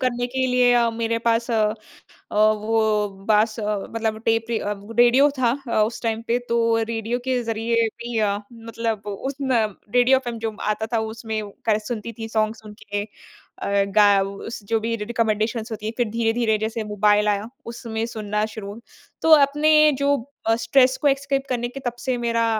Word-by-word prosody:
करने 245 -1 0
के 260 +1 -1
लिए 250 -1 +4
अ, 235 -1 +3
मेरे 230 0 -1
पास 230 +1 +1
अ - - +1 0.8
अ, - - -5
वो 215 0 +2 0.2
बाँस 215 +1 +3
अ, 210 -1 -1
मतलब 220 -1 -2
टेप 225 0 +2
रि 230 - 0
अ, 205 - -2 0.2
रेडियो 245 +4 +6
था 240 -2 +3 0.2
अ, 215 - +2
उस 220 +3 -3
टाइम 225 -1 -1
पे। 235 +1 +1
तो 230 -1 +2
रेडियो 225 +1 -3
के 255 -1 0
ज़रिए 230 0 0
भी 235 0 -4
अ, 205 -2 +1 0.2
मतलब 225 -2 -4
उस 235 +7 -4
न 250 -5 +2 0.3
रेडियो 250 +2 +5
एफएम 240 -3 -5
जो 220 -1 -3 0.2
आता 220 - -4
था 230 - +3 0.2
उसमें 220 -1 -4 0.2
का 215 -2 +3
सुनती 230 -1 -5
थी 225 - -4
सॉन्ग्स 220 0 -1
उनके 210 -1 -5 0.6
अ, - - -4 0.3
गा 210 -1 +7
उस 200 +4 -6
जो 225 -1 +2
भी 230 +1 -2
रिकमेंडेशन्स 225 +1 -1
होती 215 -1 -6
हैं। 220 - -2
फिर 240 -3 0
धीरे-धीरे 225 0 +1
जैसे 220 +1 -3
मोबाइल 210 0 +2
आया 205 +1 0 0.2
उसमें 230 -1 -4
सुनना 210 -2 -2
शुरू। 215 -1 -8 0.4
तो 320 - +3 0.2
अपने 305 +1 +4
जो 280 0 +3 0.3
अ, 225 - +4
स्ट्रेस 255 +2 +3
को 295 - +3
एस्केप 275 0 +1
करने 240 -1 -1
के 275 - -8
तब 245 - -1
से 255 -1 -1
मेरा 230 -1 0
230 Hz, 185 wpm, -23 LUFS, 215-240 Hz, 0.8 s, गा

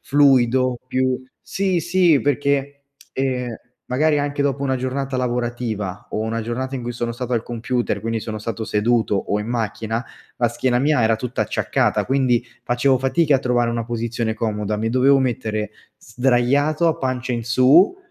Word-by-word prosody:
fluido, 130 -3 +3
più 130 0 0 0.2
sì, 190 -3 -1
sì, 175 -3 +3
perché, 140 0 -1 0.3
ehm, 130 -2 -1 0.4
magari 150 +4 +2
anche 145 0 -1
dopo 140 0 -1
una 130 -1 0
giornata 130 +1 -3
lavorativa 120 -5 -3
o 110 - -2
una 115 +1 -2
giornata 130 +4 -3
in 125 - -6
cui 120 0 -4
sono 120 0 -3
stato 125 +1 -5
al 115 -2 +1
computer, 120 -3 -2
quindi 115 +1 -2
sono 110 0 -5
stato 110 +1 -4
seduto 110 0 +1
o 105 +2 -1
in 105 - -5
macchina, 115 0 -2 0.3
la 120 -1 +2
schiena 120 +1 0
mia 145 -2 +2
era 110 0 +3
tutta 125 +2 -4
acciaccata, - - 0
quindi 130 -3 +1 0.2
facevo 125 +2 +2
fatica 145 +2 +2
a - - -1
trovare 120 -2 +1
una 115 -1 -2
posizione 115 -1 -2
comoda, 105 -2 -2
mi 110 +1 -1
dovevo 135 +2 +4
mettere 110 -4 -2 0.3
sdraiato 135 +7 +1
a 165 0 +2
pancia 130 -2 -2
in 120 -1 -2
su, 135 - +5
125 Hz, 165 wpm, -21 LUFS, 115-135 Hz, 0.4 s, su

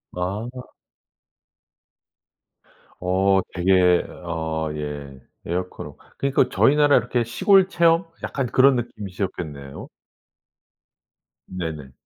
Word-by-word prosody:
아. 110 +8 -5 2.3
어 95 +2 +2
되게 90 -1 +3 0.2
어 80 -1 -3
예 70 -3 -7 0.2
에어컨 90 +2 -4
없 - - -14 0.2
그러니까 140 0 +1
저희 145 - +4
나라 145 -1 +5
이렇게 120 -1 0
시골 190 - +3
체험 170 -1 +3 0.2
약간 135 -2 -2
그런 130 +3 +4
느낌이셨겠네요. 90 - -6 1.6
네네. 80 -7 -6
95 Hz, 190 characters per minute, -23 LUFS, 80-125 Hz, 2.3 s, 나라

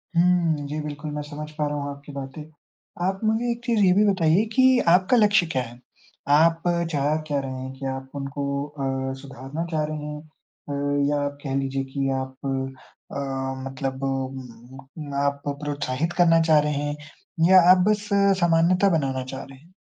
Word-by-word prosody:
हुँ। 170 -4 +3
जी, 150 +2 -4
बिल्कुल, 150 0 -6
मैं 150 0 -3
समझ 150 +1 -7
पा 150 -1 -2
रहा 145 0 -3
हूँ 145 0 -3
आपकी 140 +1 -11
बातें। 140 +2 -7 0.6
आप 195 0 -1
मुझे 220 +2 +1
एक 235 0 -5
चीज़ 235 -3 +1
ये 185 - +5
भी 210 +2 +4
बताइए 180 +2 +3
कि 260 -1 +5
आपका 185 +7 +5
लक्ष्य 210 -4 +4
क्या 130 - 0
है? 120 0 -11 0.5
आप 165 +3 +4 0.3
चाह 145 0 +1
क्या 145 -2 0
रहे 135 -1 -5
हैं? 130 0 -6
क्या 135 -1 -2
आप 130 0 -8
उनको 140 0 -3
अ, 135 -2 -3
सुधारना 140 +4 -6
चाह 155 -1 0
रहे 155 - -3 0.2
हैं 150 - -7
अ, 145 -2 -3
या 145 - +1
आप 145 0 -4
कह 135 -1 -2
लीजिए 135 0 -1
कि 135 -1 0
आप 130 0 -6
अ, 135 0 -5 0.5
मतलब 135 0 -4 1.0
म 150 -3 -7
आप 140 0 -1 0.2
प्रोत्साहित 145 +2 -2
करना 165 -2 +5
चाह 160 -2 +5
रहे 150 0 0
हैं 145 +1 -2 0.5
या 190 -1 +8
आप 185 - +7
बस 210 0 0 0.3
सामान्यता 175 +3 +4
बनाना 130 -2 -2
चाह 135 - -5
रहे 135 -1 -13
हैं? 165 +7 -22
145 Hz, 180 wpm, -24 LUFS, 135-170 Hz, 1.0 s, या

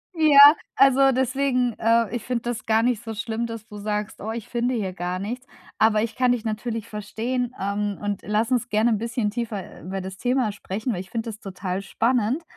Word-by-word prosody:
Ja, 310 -3 +6 0.4
also, 270 0 +5
deswegen, 255 -1 +1
äh, 230 -2 +2
ich 235 - -4
finde 245 -2 -2
das 220 -2 -4
gar 220 0 +3
nicht 240 -1 0
so 225 -1 -5
schlimm, 225 +1 -3
dass 230 -2 -7
du 210 - -10
sagst: 210 0 -3
„Oh, 220 - -4
ich 230 -1 -6
finde 245 +1 0
hier 200 -6 -2
gar 180 0 -3
nichts“, 240 +6 -5 0.3
aber 220 -1 +4
ich 220 0 -3
kann 250 -1 +3
dich 245 -3 0
natürlich 220 0 -3
verstehen, 230 +4 -3
ähm, 200 +1 -2
und 205 -1 -2
lass 215 +6 0
uns 245 0 +1
gerne 220 +2 +2
‘n 220 - +2
bisschen 230 0 -1
tiefer, 215 -3 -4
äh, - - -14
über 190 +2 -5
das 190 +1 -7
Thema 245 0 +1
sprechen, 205 +4 -4
weil 180 - -3
ich 190 - -12
finde 230 0 -3
das 215 -1 -8
total 190 -2 -4
spannend. 235 +7 0
225 Hz, 215 wpm, -24 LUFS, 210-245 Hz, 0.4 s, Ja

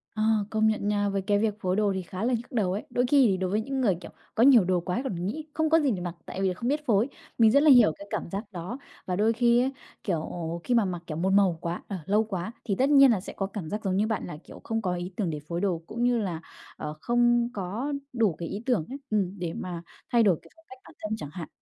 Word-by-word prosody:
Ờ, 215 - 0 0.3
công 220 0 +2
nhận 215 -1 0
nha, 205 -1 +1
với 195 -1 -1
cái 205 +1 +1
việc 215 -1 +1
phối 185 0 0
đồ 205 -1 +2
thì 190 - -2
khá 185 +3 -6
là 250 - +1
nhức 240 +3 -3
đầu 205 -7 +1
ấy. 205 - -3
Đôi 245 +1 +1
khi 270 -2 +5
thì 190 - +1
đối 185 -1 -1
với 210 +3 +1
những 270 +3 -3
người, 200 -7 +3
kiểu, - - -10 0.2
có 230 - +4
nhiều 250 -6 +7
đồ 180 0 +1
quá 180 +6 -2
còn 180 -9 -3
nghĩ 305 +10 -4
không 315 0 +1
có 325 +1 +5
gì 285 -5 +2
để 185 - -2
mặc, 175 -1 -4
tại 190 - -5
vì 195 - +2
là 185 - 0
không 235 +7 -4
biết 295 +1 -1
phối. 225 +3 +2 0.3
Mình 225 -2 +6
rất 280 +5 +5
là 310 - +6
hiểu 245 - +7
cái 200 - -10
cảm - - -3
giác 200 +3 -5
đó. 185 +7 -5 0.3
Và 180 - -1
đôi 215 +4 +3
khi 235 +1 +4
á, 265 - +1 0.3
kiểu, 170 -6 0 0.4
khi 250 - 0
mà 230 -4 +4
mặc, 175 -2 -4
kiểu, 155 - -4
một 185 +3 +1
màu 195 -4 +4
quá, 170 +1 -3
ờ, 200 - -4
lâu 210 +4 +3
quá, 195 -2 -4
thì 200 - 0
tất 265 +7 +2
nhiên 275 -3 +7
là 215 - +2
sẽ 180 - -8
có 195 - -2
cảm 195 -5 -6
giác 210 +4 -4
giống 190 -2 0
như 215 +2 +2
bạn 220 - -2
là, 160 -4 -7
kiểu, - - -13
không 225 -1 -2
có 180 -3 -1
ý 175 +1 -5
tưởng 195 -6 -1
để 150 - -3
phối 170 +1 -3
đồ 180 -5 0
cũng 235 +2 -3
như 245 0 +3
là, 180 -7 -2 0.4
ờ, 150 0 -5
không 240 0 +3
có 215 +9 -3 0.2
đủ 225 -7 +2
cái 170 - -4
ý 205 +6 -5
tưởng 240 -12 +1
ấy, 270 - -5
ừm, 200 -2 -1
để 170 -2 -3
mà 175 -2 -5 0.3
thay 235 -2 +5
đổi 185 -6 +4
cái - - -19
phong 325 0 -24
cách 260 0 -12
bản - - -15
thân 215 +1 -1
chẳng 150 -9 -7
hạn 165 -3 -6
205 Hz, 295 wpm, -27 LUFS, 185-240 Hz, 0.4 s, nhiều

